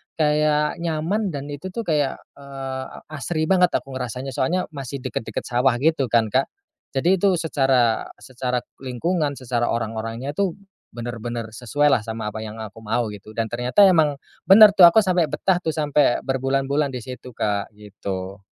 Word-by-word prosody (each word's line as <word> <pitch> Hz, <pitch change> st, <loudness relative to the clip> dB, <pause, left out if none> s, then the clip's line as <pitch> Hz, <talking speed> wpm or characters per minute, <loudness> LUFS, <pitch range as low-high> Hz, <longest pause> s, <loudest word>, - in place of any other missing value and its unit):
kayak 150 Hz, 0 st, +1 dB
nyaman 170 Hz, +6 st, -1 dB
dan 145 Hz, -4 st, -5 dB
itu 145 Hz, +6 st, -6 dB
tuh 230 Hz, -, -2 dB
kayak, 150 Hz, -6 st, 0 dB, 0.2 s
eee, 135 Hz, -1 st, -6 dB, 0.3 s
asri 155 Hz, +2 st, -2 dB
banget 180 Hz, +2 st, +4 dB
aku 135 Hz, -, -3 dB
ngerasanya. 130 Hz, +1 st, -5 dB
Soalnya 170 Hz, +8 st, 0 dB
masih 140 Hz, -2 st, -6 dB
deket-deket 125 Hz, -3 st, -4 dB
sawah 125 Hz, +1 st, +2 dB
gitu 155 Hz, -5 st, +2 dB
kan 115 Hz, -2 st, +2 dB
Kak, 130 Hz, +4 st, +2 dB, 0.5 s
jadi 175 Hz, +7 st, +2 dB
itu 195 Hz, -1 st, +3 dB
secara 135 Hz, -8 st, +1 dB, 0.2 s
secara 125 Hz, -1 st, -3 dB, 0.2 s
lingkungan 145 Hz, +4 st, -1 dB
secara 120 Hz, -2 st, -1 dB
orang-orangnya 115 Hz, +3 st, -3 dB
tuh 185 Hz, +3 st, -1 dB, 0.4 s
benar-benar 120 Hz, -1 st, -5 dB
sesuailah 125 Hz, +5 st, +2 dB
sama 110 Hz, -1 st, -4 dB
apa 110 Hz, -, -6 dB
yang 110 Hz, 0 st, -7 dB
aku 110 Hz, +1 st, -10 dB
mau, 110 Hz, 0 st, -1 dB
gitu. 105 Hz, +1 st, -11 dB
Dan 115 Hz, -1 st, -2 dB
ternyata 125 Hz, +11 st, +3 dB
emang 160 Hz, -6 st, +5 dB, 0.3 s
benar 210 Hz, +2 st, +9 dB
tuh, 185 Hz, -4 st, +8 dB
aku 220 Hz, +6 st, +5 dB
sampe 180 Hz, -4 st, +2 dB
betah 180 Hz, +5 st, 0 dB
tuh 160 Hz, -3 st, -3 dB
sampe 150 Hz, -4 st, +2 dB
berbulan-bulan 135 Hz, +2 st, 0 dB
di 125 Hz, -, -5 dB
situ 125 Hz, -1 st, -9 dB
Kak, 105 Hz, 0 st, -2 dB
gitu. 100 Hz, -2 st, -6 dB
135 Hz, 160 wpm, -22 LUFS, 120-155 Hz, 0.5 s, benar